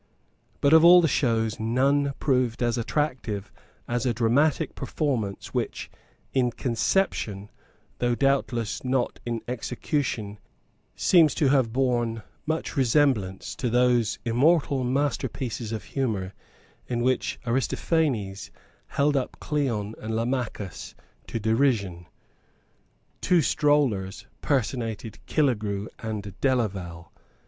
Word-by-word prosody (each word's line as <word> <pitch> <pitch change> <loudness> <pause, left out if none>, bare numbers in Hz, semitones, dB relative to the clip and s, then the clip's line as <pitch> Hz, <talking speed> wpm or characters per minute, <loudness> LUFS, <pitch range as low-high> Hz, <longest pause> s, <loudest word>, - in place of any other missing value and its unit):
But 140 +2 +4
of 160 0 +8
all 175 +1 +9
the 170 - +3
shows 115 -6 0
none 135 +5 +2
proved 125 -4 0
so 120 0 0
attractive 120 -7 -2 0.4
as 120 -1 -1
a 120 -3 0
dramatic 125 +7 +2
performance 130 -8 -3
which, - - -3 0.4
in 125 -2 +2
conception, 115 - -1 0.5
though 120 -1 +1
doubtless 130 -4 0
not 130 -1 -1
in 115 -1 -3
execution, 120 -3 -3 0.6
seems 160 -6 +4
to 145 -5 +2
have 130 -5 +3
borne 120 -3 0 0.2
much 160 +2 -2
resemblance 125 -8 +1
to 125 - -1
those 120 -2 +2
immortal 135 +3 +2
masterpieces 130 -3 -2
of 110 -3 -4
humour 100 -6 -2 0.5
in 120 -1 -1
which 130 0 0
Aristophanes 120 - 0 0.4
held 145 +1 +1
up 130 -2 -2
Cleon 120 -9 -1
and 110 +1 -4
Lamachus 115 -5 -3 0.3
to 115 - -3
derision. 110 -7 +1 1.1
Two 175 -3 +3
strollers 125 -11 +1 0.2
personated 115 -5 -2
Killegrew 105 -8 0
and 105 -3 -5
Delaval. 95 -10 -1
120 Hz, 105 wpm, -26 LUFS, 110-140 Hz, 1.1 s, all